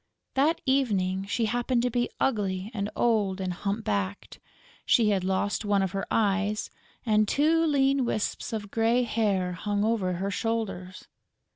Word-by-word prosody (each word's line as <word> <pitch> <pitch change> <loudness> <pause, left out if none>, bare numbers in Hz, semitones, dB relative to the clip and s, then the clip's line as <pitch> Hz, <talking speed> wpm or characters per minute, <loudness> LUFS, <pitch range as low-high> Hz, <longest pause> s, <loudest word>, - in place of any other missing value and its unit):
That 300 +5 +2
evening, 195 -8 +1
she 230 +2 0
happened 240 +2 0
to 250 - 0
be 240 +1 0
ugly 200 -4 -1
and 205 -2 -2
old 210 -5 +1
and 185 -1 -2
hump 200 +4 -3
backed; 100 -1 -3 0.4
she 225 -3 +4
had 195 -3 +1
lost 190 +3 0
one 205 -2 +2
of 190 - -1
her 195 0 -3
eyes; 205 0 0 0.3
and 215 -2 +3
two 320 +6 +3
lean 275 -2 +2
wisps 225 0 -2
of 205 -3 -5
grey 230 +2 +2
hair 205 -6 0
hung 205 +3 -1
over 210 -5 0
her 195 +3 -2
shoulders. 200 -4 -3
210 Hz, 155 wpm, -27 LUFS, 195-235 Hz, 0.4 s, she